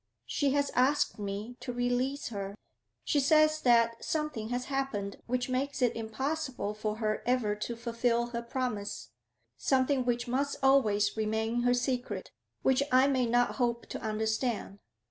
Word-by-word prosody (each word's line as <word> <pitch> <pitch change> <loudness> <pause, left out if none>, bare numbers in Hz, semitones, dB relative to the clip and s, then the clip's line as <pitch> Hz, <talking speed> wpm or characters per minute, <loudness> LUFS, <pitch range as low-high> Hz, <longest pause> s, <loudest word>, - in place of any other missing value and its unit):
She 285 - 0
has 285 0 +1
asked 260 -1 +2
me 205 +4 -5
to 250 - -5
release 245 +3 -1
her. 200 -2 -5 0.5
She 290 - +2
says 310 +2 +4
that 230 -1 +3
something 300 -8 -2
has 245 +1 -2
happened 265 -8 -2
which 245 +1 0
makes 265 +2 -1
it 245 -3 +2
impossible 250 0 -3
for 215 0 -3
her 215 -1 -1
ever 245 -4 +2
to 235 +3 -4
fulfil 235 0 0
her 235 -1 -2
promise, 235 -4 -4 0.5
something 265 0 +2
which 245 0 -1
must 275 +3 0
always 210 -7 +4
remain 220 +2 0
her 245 0 +3
secret, 250 0 -2 0.3
which 265 0 +3
I 255 +1 +6
may 260 -3 +2
not 245 +1 +2
hope 235 -2 0
to - - -5
understand. 220 -1 -1
245 Hz, 150 wpm, -30 LUFS, 220-265 Hz, 0.5 s, I